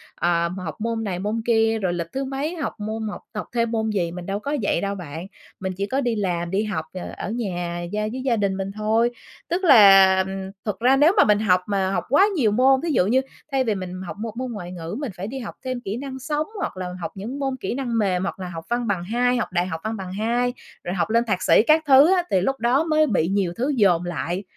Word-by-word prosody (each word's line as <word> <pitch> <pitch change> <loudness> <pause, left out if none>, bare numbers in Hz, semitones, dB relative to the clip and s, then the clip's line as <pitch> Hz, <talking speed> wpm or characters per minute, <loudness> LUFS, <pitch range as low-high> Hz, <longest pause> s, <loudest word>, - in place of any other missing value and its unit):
ờ, 170 0 +1
học 185 +2 -6
môn 230 0 -1
này 185 -4 -3
môn 210 +3 -2
kia, 225 -1 +2
rồi 180 -2 0
lịch 170 -1 -3
thứ 270 +1 -2
mấy 275 +6 -3
học 310 - -4
môn 220 +1 -3
học - - -7
học 210 - -4
thêm 235 -1 0
môn 220 -1 0
gì, 180 -5 -1
mình 175 0 -7
đâu 195 +2 -2
có 285 +7 -2
vậy 185 - +1
đâu 200 0 -2
bạn. 165 0 -7 0.3
Mình 190 -1 -3
chỉ 200 - -1
có 270 +4 0
đi 240 -3 0
làm, 175 -4 -2
đi 200 +2 +1
học, 190 -7 -3
ờ, 185 - -6
ở 205 - -4
nhà 175 -7 -3
gia 210 - 0
với 260 - -4
gia 235 -4 +2
đình 195 -2 0
mình 195 0 -3
thôi. 220 +3 +2 0.4
Tức 355 +3 -1
là, 195 - +7 0.4
thực 210 -2 -3
ra 255 +3 +4
nếu 305 +6 +5
mà - - +8
mình 210 -1 +4
học 185 -4 +3
mà 195 -2 0
học - - -1
quá 335 +8 +6
nhiều 230 -9 +2
môn, 260 +4 +4
ví 335 - 0
dụ 180 - +3
như 260 +4 +3 0.3
thay 270 -1 +2
vì 220 -4 0
mình 185 -1 -6
học 205 - -7
một 225 0 -5
môn 255 -1 -3
ngoại 180 -5 -6
ngữ, 170 +2 -6
mình 275 -8 -4
phải 190 - -4
đi 265 +4 -5
học 230 - -7
thêm 255 -1 -3
kỹ 210 +1 -4
năng 265 0 -6
sống, 295 +3 -2
hoặc - - -3
là 185 -1 -4
học - - -4
những 225 +8 -6
môn 270 -2 -1
kỹ - - -3
năng 245 -4 -2
mềm, 190 -3 +1
hoặc 195 - -4
là 185 -1 -5
học 165 -1 -7
văn 240 0 -1
bằng 185 -4 -1
hai, 245 +5 +1
học 235 - -2
đại 175 - +1
học 160 -2 -5
văn 220 0 -2
bằng 185 -1 -6
hai, 240 +4 0 0.3
rồi 175 +2 -3
học 185 - 0
lên 230 +1 +3
thạc 190 -5 -1
sĩ - - +5
các 315 +1 +5
thứ 285 +6 +7
á 360 - +1
thì 185 - +3
lúc 270 +7 -1
đó 250 +6 +2
mới 310 -1 +3
bị 180 -8 +1
nhiều 190 -2 0
thứ 260 +5 0
dồn 180 -7 +3
lại 175 +2 -3
215 Hz, 265 wpm, -23 LUFS, 185-250 Hz, 0.4 s, mà